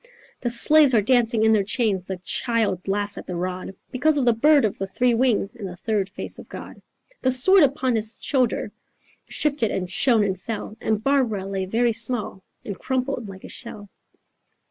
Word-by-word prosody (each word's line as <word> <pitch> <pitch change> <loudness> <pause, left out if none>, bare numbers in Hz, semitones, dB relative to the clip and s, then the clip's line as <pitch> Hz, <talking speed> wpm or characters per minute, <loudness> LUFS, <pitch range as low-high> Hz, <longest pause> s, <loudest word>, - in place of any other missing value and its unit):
The 240 - -2
slaves 275 +3 +6
are 215 - +4
dancing 235 -1 +2
in 220 0 +4
their 215 - +3
chains, 200 -3 -1
The 190 0 -5
child 205 +1 -2
laughs 205 +1 -1
at - - -12
the 180 - -5
rod, 185 +2 -5 0.2
Because 295 +4 +1
of 270 - +1
the 240 - +4
bird 285 +3 +4
of 205 - -3
the 195 - -3
three 245 +5 +1
wings, 230 -4 +1
And 210 -6 -7
the 180 - -9
third 205 0 -2
face - - -7
of - - -13
God.' - - -10 0.4
The 260 - +1
sword 320 +10 +5
upon 270 -3 +1
his 220 +1 -2
shoulder 255 -5 0 0.6
Shifted 285 -7 0
and 180 -1 -3
shone 225 +3 +3
and 190 -2 -2
fell, 215 0 -6
And 215 -1 -1
Barbara 245 -8 0
lay 195 -1 -3
very 230 +4 +1
small 225 -4 -1 0.2
And 200 - -6
crumpled 255 -4 -3
like 190 -1 -11
a - - -10
shell." 205 -4 -8
225 Hz, 190 wpm, -23 LUFS, 195-255 Hz, 0.6 s, slaves